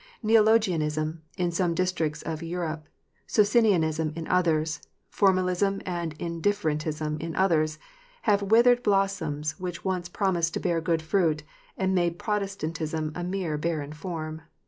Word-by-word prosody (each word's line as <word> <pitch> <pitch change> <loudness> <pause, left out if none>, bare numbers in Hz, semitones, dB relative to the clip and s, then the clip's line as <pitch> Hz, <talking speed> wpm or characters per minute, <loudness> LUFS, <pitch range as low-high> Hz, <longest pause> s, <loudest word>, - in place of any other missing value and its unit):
Neologianism 180 -9 +2 0.2
in 175 -2 0
some 170 0 0
districts 170 -4 -1
of 160 -1 -4
Europe, 165 -2 -4 0.4
Socinianism 185 -8 +3
in 165 -1 -5
others, 160 -4 +1 0.3
formalism 190 0 +2
and 170 -3 -3
indifferentism 155 -4 -1
in 165 0 -4
others, 155 -5 +2 0.5
have 205 -2 +3
withered 235 +4 +5
blossoms 160 -8 0
which 180 -1 -5
once 180 -2 -1
promised 175 -4 0
to - - 0
bear 170 -3 0
good 165 -1 0
fruit, 160 -3 +1 0.3
and 190 0 +1
made 175 -2 +1
Protestantism 165 -7 -2
a 175 - -4
mere 175 -4 -2
barren 155 -2 -2
form. 160 -1 -5
170 Hz, 125 wpm, -27 LUFS, 155-195 Hz, 0.5 s, withered